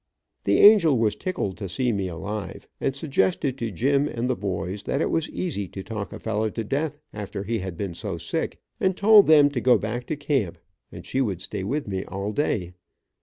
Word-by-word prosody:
The 100 - +3
angel 190 - +7
was 110 -2 +2
tickled 140 - -3
to 100 -3 -5
see 120 +7 0
me 100 -3 -1
alive, 100 +4 -6
and 135 - -1
suggested 135 - 0
to 115 - -2
Jim 140 - +1
and 120 -3 -2
the 130 - +1
boys, 95 -1 -3
that 140 - -2
it - - 0
was 165 -1 0
easy 100 - -3
to 95 +2 -8
talk 105 -2 -5
a - - -6
fellow 110 0 -1
to 115 +2 -4
death 145 +6 -2 0.2
after 100 -1 -5
he 115 +2 -1
had 95 -3 -5
been 95 -2 -3
so - - -4
sick, - - -3 0.2
and 190 -1 +1
told 210 0 +7
them 150 -2 +7
to 125 -4 -2
go 125 0 +5
back 120 +3 -4
to 155 - -1
camp, 140 - -1 0.3
and - - -10
she 135 - -1
would 100 -9 -1
stay 95 - -5
with 140 +8 -2
me 95 -1 -2
all 100 +2 -4
day. 100 - -1
115 Hz, 215 wpm, -25 LUFS, 100-145 Hz, 0.3 s, angel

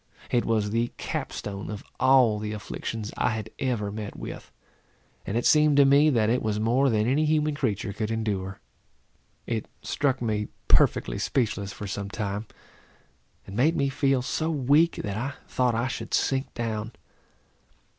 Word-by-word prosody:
It 120 - +2
was 105 -2 +1
the 115 +2 +1
cap - - -3
stone 100 -1 -6
of 105 -2 -6 0.2
all 130 -5 +5
the 105 0 -4
afflictions 105 +1 -5
I - - +2
had 110 -2 -4
ever 115 -6 -1
met 105 0 -6
with; - - -8 0.8
and 105 - -1
it 120 - -1
seemed 150 -1 +5
to 140 - +7
me, 140 +3 +6
that 115 -6 +2
it 125 +3 +2
was 105 -1 -1
more 125 +5 +3
than 110 -2 +2
any 140 +5 +2
human 155 0 +2
creature 110 -8 -2
could 110 +1 -3
endure. 100 -4 -2 0.9
It 115 -2 -2 0.2
struck 135 -3 0
me 105 -3 -1 0.2
perfectly - - +3
speechless 105 -6 -1
for 105 - -7
some 100 0 -4
time, 105 0 -3 1.0
and 95 - -9
made 150 +9 +3
me 140 -3 +1
feel 135 -2 +1
so 160 +4 -1
weak, 150 +3 +3
that 100 -1 -3
I 135 +5 -3
thought 125 -2 +1
I 115 +3 0
should 130 - -3
sink 135 0 0
down. 115 -1 -3
115 Hz, 165 wpm, -26 LUFS, 105-135 Hz, 1.0 s, to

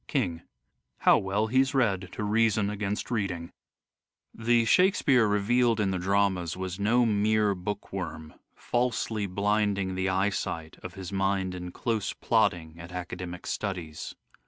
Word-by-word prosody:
King: 90 - -1 0.6
How - - +6
well 100 +3 0
he's 130 +4 +2
read 100 -8 +1
to - - -4
reason 105 -1 +2
against 105 +2 -3
reading." 90 -7 -2 0.8
The 115 0 +2
Shakespeare 140 - +4
revealed 115 +3 +2
in 100 -2 +1
the 95 - -1
dramas 95 -2 +1
was 95 0 -4
no 120 +4 +3
mere 105 -1 +2
book 100 +2 -5
worm 80 -5 -5
" - - -46
falsely 115 -4 -1
blinding 100 0 0
the 95 0 -1
eyesight 95 -4 -1
" - - -29
of 95 -1 -7
his 95 -2 -7
mind 95 -1 0
in 90 -1 -6
close 110 -1 -2
plodding 80 -1 0
at 85 +1 -9
academic 90 0 -6
studies. 90 -7 -4
100 Hz, 145 wpm, -28 LUFS, 90-110 Hz, 0.8 s, How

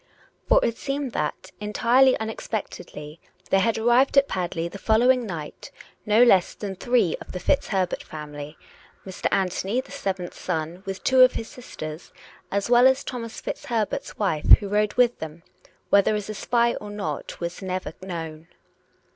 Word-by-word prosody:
For - - +6
it 230 - -1
seemed 275 -2 -3
that, - - -3
entirely 235 +5 +3
unexpectedly, 180 -8 -6 0.3
there 195 - +5
had 225 +3 +1
arrived 240 +5 +3
at 275 0 +6
Padley 175 -2 -2
the 200 +3 -9
following 240 +3 +3
night 160 -5 -7 0.4
no 215 +3 +6
less 195 -7 +4
than 200 -2 -5
three 240 -5 +1
of - - -10
the 180 - -4
FitzHerbert 190 -7 0
family, 150 0 -8 0.5
Mr. 190 -1 -3
Anthony 195 +4 0
the 260 - -7
seventh 190 -10 -4
son, 165 0 -4
with 195 0 -5
two 260 -1 +4
of 255 0 +7
his 225 - -5
sisters, 155 -9 -9 0.4
as 200 0 -1
well 245 +1 +6
as 265 0 +2
Thomas 230 -3 -6
FitzHerbert's 230 -7 -3
wife, 160 -8 +5
who 205 - -7
rode 210 +1 +1
with 245 -1 +3
them, 160 +1 -8 0.5
whether 200 +1 +4
as 210 0 -4
a - - -5
spy 235 +3 +1
or 210 - -7
not 205 -1 -5
was 170 +2 -5
never 185 -3 -4
known. 165 -3 -6
205 Hz, 160 wpm, -24 LUFS, 175-240 Hz, 0.5 s, of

